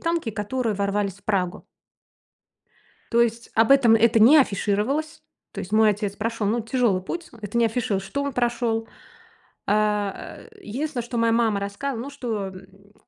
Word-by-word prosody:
танки, 335 -8 -1
которые 220 +2 -2
ворвались 200 -1 -1
в 200 - -22
Прагу. 185 -4 -1 1.5
То 235 - +3
есть 235 0 0
об 225 +3 +3
этом 260 -5 +6
это 225 0 +4
не 255 +8 +8
афишировалось. 255 +7 0 0.3
То - - -6
есть 185 - -8
мой 215 0 +5
отец 205 -1 -3
прошел, 225 -1 -2
ну, 230 +3 +1
тяжелый 225 -5 0
путь. 340 - -6
Это 210 +2 -5
не 235 - +4
афишировалось, 220 -4 -2
что 280 - -3
он 280 0 -3
прошел. 235 -2 -1 0.8
А, 210 -1 -1
э, - - -15
единственное, 265 - -4
что 240 0 -6
моя 230 0 +2
мама 225 -3 +2
рассказывала, 225 +5 -4
ну, 280 - -7
что, 225 -8 -4
м, 195 +2 -15
225 Hz, 165 wpm, -24 LUFS, 205-245 Hz, 1.5 s, не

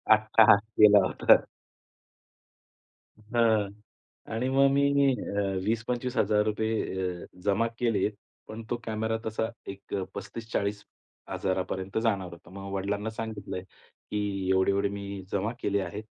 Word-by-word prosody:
अट्टाहास 110 -1 +5 0.2
केला 105 -1 +8
होता. - - +5 2.0
हां. 110 -4 +3 0.6
आणि 120 +4 -1
मग 135 +1 +5
मी 140 +1 +3 0.3
अ, 100 -4 -3 0.2
₹20,000-₹25,000 110 -5 0
अ, - - -9 0.2
जमा 105 +3 +2
केलेत 115 -3 +1 0.4
पण 110 +1 -7
तो 120 - +1
कॅमेरा 110 0 -1
तसा 110 +1 -1 0.2
एक 100 0 -10
अ, 95 - 0
35,000-40,000 100 -3 -4
जाणार 95 -6 0
होता. 85 0 -13
मग 100 +1 -8
वडिलांना 100 +2 -2
सांगितलं 110 -3 -5
आहे, 90 - -5 0.5
की 100 -2 -2
"एवढे, 95 +1 +3
एवढे 100 +1 +1
मी 100 -1 -6
जमा 100 +3 0
केले 100 0 0
आहेत." 105 +2 -5
105 Hz, 120 wpm, -28 LUFS, 100-110 Hz, 2.0 s, केला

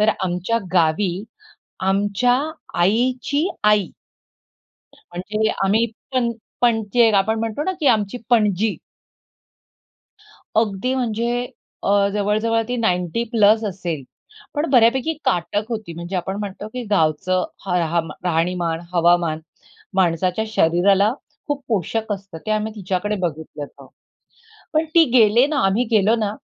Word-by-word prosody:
तर 210 - +3 0.2
आमच्या 180 +6 -1
गावी, 175 +2 +2 0.7
आमच्या 205 +6 +2 0.4
आईची 255 - +1 0.2
आई, 210 -3 +4 1.1
म्हणजे 210 +5 -3 0.2
आम्ही 220 +4 +3 0.3
पण 240 -2 +1 0.3
पणजी 230 -1 +1
एक 225 -3 +5
आपण 220 +3 +2
म्हणतो 225 +5 -2
ना 375 - 0
की 290 - 0
आमची 215 +1 +1
पणजी. 210 -2 +2 1.8
अगदी 220 +4 -1
म्हणजे 235 -3 -1 0.6
अ, - - 0 0.2
जवळ-जवळ 215 +3 +1
ती 245 - -1
90 180 -1 0
प्लस 220 0 +4
असेल, 175 -7 -4 0.5
पण 295 +3 0
बऱ्यापैकी 255 +4 +4
काटक 185 +4 0
होती. 215 -7 -5
म्हणजे 170 +3 -5
आपण 190 +2 -3
म्हणतो, 205 +1 -6
की 250 +3 -6
गावचं 185 +1 +1 0.2
ह 180 - -2 0.2
हम 165 -2 0
राहणीमान, 170 -1 0
हवामान, 170 -2 +3 0.5
माणसाच्या 180 +2 +1
शरीराला 195 +3 +3 0.4
खूप 285 -1 -2
पोषक 220 +1 -1
असतं. 195 -4 -7
ते - - -2
आम्ही 215 0 -1
तिच्याकडे 195 +1 -2
बघितलं 155 -2 -7
होतं. - - -15 0.9
पण 315 +1 +2
ती 335 - +8
गेले 230 +3 +5
ना, 295 -2 -1
आम्ही 205 +6 +2
गेलो 215 +1 +4
ना, 210 -2 -1
210 Hz, 125 wpm, -21 LUFS, 180-230 Hz, 1.8 s, ती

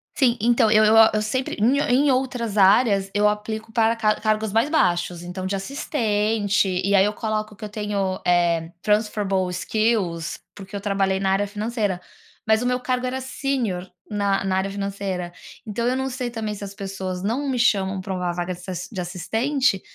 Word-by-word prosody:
Sim, 250 -4 +3
então, 235 0 +4
eu 215 0 +6
eu 215 +1 +5
a 225 0 +8
eu 215 - +1
sempre 255 +5 -2
em 250 +7 +3
ou - - -1
em 270 +4 +3
outras 250 -5 -1
áreas 200 0 +4
eu 205 0 +3
aplico 220 +1 -3
para 225 0 +2
car 215 -2 +1
cargos 215 -1 0
mais 225 +7 +2
baixos, 175 - +1
então 180 +1 -6
de 195 +1 -1
assistente, 210 -3 0 0.2
e 200 +2 +1
aí 195 -1 +6
eu 210 - 0
coloco 215 0 -3
que 215 - -13
eu 210 - -4
tenho, 205 -3 -2
eh, 170 -2 +2
transferable 210 -3 +1
skills, 185 -3 -1 0.2
porque 195 0 -10
eu 200 - -4
trabalhei 195 -1 0
na 190 -1 +1
área 200 +1 +1
financeira, 210 -2 -2 0.4
mas 220 +1 +3
o - - -2
meu 250 0 +1
cargo 250 0 -1
era 260 +1 -2
sênior 250 -9 -2 0.2
na 200 -2 0
na 190 -1 0
área 190 +1 0
financeira. 195 -3 -4 0.3
Então 230 +2 -2
eu 250 - +1
não 265 0 -1
sei 250 -1 -3
também 220 -3 -4
se 205 - -8
as 200 0 -7
pessoas 190 -2 -5
não 245 +8 -1
me 255 -2 -1
chamam 195 -5 +2
pra 190 +1 -4
um 185 - -3
vaga 175 0 -2
de 175 - -11
ass 180 -1 -5
de 200 - -5
assistente, 225 +6 0
210 Hz, 200 wpm, -23 LUFS, 190-230 Hz, 0.4 s, a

